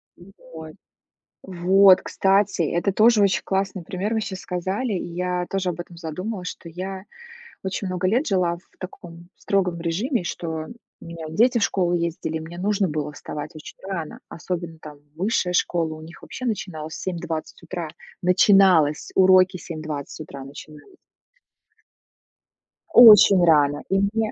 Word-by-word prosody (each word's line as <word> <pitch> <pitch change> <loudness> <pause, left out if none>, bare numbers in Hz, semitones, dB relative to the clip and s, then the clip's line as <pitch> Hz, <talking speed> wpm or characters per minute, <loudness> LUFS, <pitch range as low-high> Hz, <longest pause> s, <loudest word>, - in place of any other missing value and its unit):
Ну, 175 +3 -16 0.2
вот. 160 -1 -9 0.7
Вот, 190 +1 +5
кстати, 195 -1 +1
это 170 +5 0
тоже 215 +2 +4
очень 195 -2 +2
классный 190 -2 -2
пример. 195 +6 -3
Вы 220 - 0
сейчас 190 -3 -5
сказали, 190 +7 -3
и 175 -2 -4
я 180 0 -2
тоже 190 -2 -1
об 175 - -5
этом 175 0 -8
задумалась, 180 +4 -5
что - - -10
я 185 +3 -6 0.6
очень 190 +1 -4
много 185 0 -1
лет 245 +8 +1
жила 180 -4 +1
в 175 - -24
таком 175 -2 -10
строгом 180 -4 -1
режиме, 185 - -1
что 160 -2 -4 0.3
у - - -13
меня 170 -1 -8
дети 235 +9 +3
в - - -2
школу 180 -2 +1
ездили, 170 -2 -2
мне 165 +2 -9
нужно 200 0 0
было 150 -1 -3
вставать 145 0 -7
очень 155 - -11
рано, 170 -6 -5
особенно, 170 -1 -6
там, 150 -2 -11 0.2
высшая 180 +1 -1
школа 170 -2 0
у 155 - -11
них 165 +2 -13
вообще 255 - -7
начиналась 160 -8 -4
в - - -8
7:20 170 -3 -5
утра. 170 -1 -6 0.3
Начиналось 180 -4 +4
уроки 185 0 +5
7:20 155 -3 -7
утра 140 -3 -8
начинались. 150 - -13 2.0
Очень 210 -5 +9
рано. 145 -3 +3
И 195 +1 +2
мне 215 +2 0
180 Hz, 150 wpm, -23 LUFS, 165-195 Hz, 2.0 s, Очень